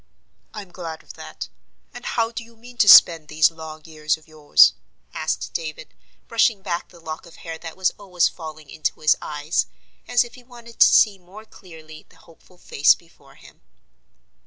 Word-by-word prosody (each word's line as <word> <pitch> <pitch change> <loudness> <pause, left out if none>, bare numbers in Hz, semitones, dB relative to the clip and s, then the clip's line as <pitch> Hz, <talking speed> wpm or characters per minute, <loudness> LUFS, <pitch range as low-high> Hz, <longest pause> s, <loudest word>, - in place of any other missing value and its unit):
"I'm 200 -4 -10
glad 165 -3 -8
of - - -12
that; - - -9 0.5
and - - -10
how 230 -1 -1
do 235 - -6
you 230 0 -19
mean 245 +2 -15
to 205 - +4
spend 165 -4 +8
these 155 +2 +3
long 160 -1 -11
years 155 -1 -2
of 160 - -23
yours?" 150 - +5 0.4
asked - - -3
David, 155 -1 -6 0.3
brushing 225 -3 +1
back 170 -3 -4
the 175 - -17
lock 160 +1 -8
of 170 - -16
hair 165 -1 -9
that 165 0 -9
was 190 -1 +1
always 180 -4 +1
falling 155 -3 -10
into 155 - -3
his 155 - +4
eyes, 150 - -2 0.4
as 245 0 +3
if 240 0 -13
he 250 - -15
wanted 240 -2 -15
to - - +7
see 205 -3 +4
more 190 +5 -14
clearly 160 -6 -15
the - - -22
hopeful 175 +2 -22
face 145 -4 +3
before 140 -5 -22
him. - - -19
170 Hz, 180 wpm, -22 LUFS, 155-210 Hz, 0.5 s, spend